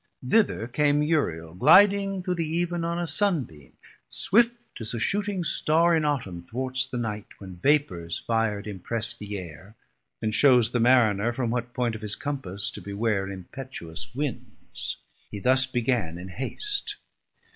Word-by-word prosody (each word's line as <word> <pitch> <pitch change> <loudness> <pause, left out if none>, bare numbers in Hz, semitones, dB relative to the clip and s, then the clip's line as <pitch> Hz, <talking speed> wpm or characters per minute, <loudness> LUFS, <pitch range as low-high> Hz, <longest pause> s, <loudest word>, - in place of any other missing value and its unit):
Thither 195 - +2
came 145 +3 +2
Uriel, 85 - -1
gliding 195 - +5
through 180 - -1
the 170 -2 -1 0.2
Eeven 175 -1 -1
On 170 +1 -1
a 175 - -1
Sun 170 -1 +1
beam, 75 - -16 0.4
swift 235 +3 +2 0.2
as 110 +1 -1
a - - -3
shooting 200 - -1
Starr 165 +1 +3
In 155 -2 +1
Autumn 115 -12 -2
thwarts 130 +6 -3
the 130 - -5
night, 105 -3 -4
when 95 -3 -10
vapors 90 - +1
fir'd 115 -3 -1
Impress 110 +3 -1
the 105 -3 -6
Air, 95 +4 -10 0.4
and 110 - -2
shews 125 -3 +5
the 120 - 0
Mariner 115 -3 +4
From 120 -1 -2
what 120 0 -3
point 120 -2 0
of 110 - -7
his 105 -1 -1
Compass 135 -10 -2
to - - -8
beware 100 -1 -1
Impetuous 95 -1 -7
winds: 145 -3 -3 0.3
he 100 - -6
thus 130 +4 +3
began 120 -9 -1
in 90 +2 -8
haste. 405 - -2
125 Hz, 155 wpm, -26 LUFS, 105-150 Hz, 0.4 s, gliding